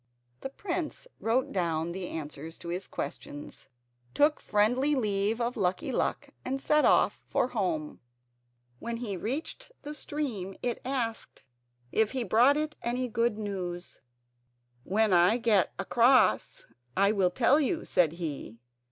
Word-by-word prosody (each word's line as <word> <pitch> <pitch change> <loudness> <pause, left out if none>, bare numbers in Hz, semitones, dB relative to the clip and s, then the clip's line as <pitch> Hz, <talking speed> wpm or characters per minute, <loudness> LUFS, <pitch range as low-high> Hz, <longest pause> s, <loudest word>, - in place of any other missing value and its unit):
The 270 - -5
prince 345 - -4
wrote 240 +3 +1
down 170 -2 -1
the 180 0 -4
answers 155 +1 -7
to 170 - -8
his 180 +2 -3
questions, 145 0 -7 0.5
took 295 +1 +4
a - - -20
friendly 245 +8 +2
leave 210 -2 0
of 240 +1 -1
Lucky 185 -3 -1
Luck, - - -1
and 270 +1 -2
set 300 +2 +3
off - - +3
for 250 - +1
home. 175 -10 -2 0.8
When 235 0 -4
he 225 -5 -3
reached 290 - -4
the 295 - -5
stream 245 -12 -4
it 245 -1 -1
asked 245 - -3 0.5
if 220 +1 +2
he 260 -2 0
brought 245 +6 +4
it 305 0 -2
any 250 +2 -1
good 230 -1 +1
news. 185 -4 -5 0.8
"When 210 +3 +2
I 180 +6 +5
get 220 -6 +3
across 240 - +3 0.3
I 200 +1 +4
will 195 -4 +2
tell 245 +9 +3
you," 315 +3 0
said 170 -4 +2
he. 150 -9 -5
220 Hz, 145 wpm, -29 LUFS, 180-255 Hz, 0.8 s, I